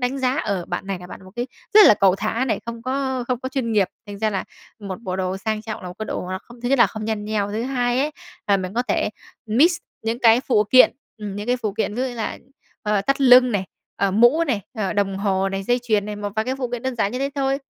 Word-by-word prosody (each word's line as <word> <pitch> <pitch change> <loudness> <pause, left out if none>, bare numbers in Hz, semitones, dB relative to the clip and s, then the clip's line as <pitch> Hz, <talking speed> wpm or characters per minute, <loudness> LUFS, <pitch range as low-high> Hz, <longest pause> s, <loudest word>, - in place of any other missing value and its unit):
đánh 255 +2 -1
giá: 260 +1 +1
"Ờ, 195 -4 -1
bạn 195 - -4
này 195 -2 -3
là 180 - -10
bạn 185 - -11
một 185 - -13
cái 240 +1 -2 0.3
rất 425 -1 +10
là - - +8
cẩu 195 -2 +3
thả 225 +4 -1
này, 260 - -1
không 235 0 -6
có 260 -1 -2
không 250 - 0
có 260 - -3
chuyên 255 -4 -2
nghiệp." 200 -3 +3 0.2
Thành 200 -1 -8
ra 215 0 +1
là 190 -2 -2 0.3
một 195 -1 -6
bộ 185 -3 -3
đồ 185 0 -2
sang 215 +1 -3
trọng 220 -1 -6
là 180 - -6
một 180 - -9
cái 215 - -4
đồ - - -3
nó 185 - -2
không 240 0 -15
thứ 245 - -2
nhất 275 -1 +3
là 235 - +7
không 215 -1 -7
nhăn 215 -2 -2
nheo, 210 -1 -1
thứ 220 +3 -2
hai 245 -1 0
ấy, 295 +2 0 0.4
là 200 -1 +4
mình 185 +2 -5
có 245 - +1
thể - - +1 0.4
mix 295 +11 +4 0.3
những 225 +2 -2
cái 230 0 +5
phụ 220 -6 +2
kiện, 255 - +8 0.3
ừm, 205 -2 -6
những 205 +2 -5
cái 250 +1 +2
phụ 215 -4 -3
kiện 210 0 -2
ví 250 - -1
dụ 260 - 0
như 245 - -7
là, 225 - -4 0.4
ờ, 210 -2 +1
thắt 275 +3 0
lưng 250 -2 +7
này, 195 -2 0 0.3
ờ, 200 -1 +1
mũ 240 - +4
này, 245 -10 0 0.2
ờ, 195 -3 -1
đồng 200 -2 0
hồ 195 -1 +1
này, 195 0 -3
dây 245 +5 +1
chuyền 215 -4 +1
này, 210 -1 -5
một 205 -1 -4
vài 220 - +1
cái 255 +2 -1
phụ 250 -2 -2
kiện 245 -1 -5
đơn 260 -1 -2
giản 205 0 0
như 250 - -3
thế 275 +1 -1
thôi. 275 0 0
220 Hz, 290 wpm, -22 LUFS, 200-250 Hz, 0.4 s, rất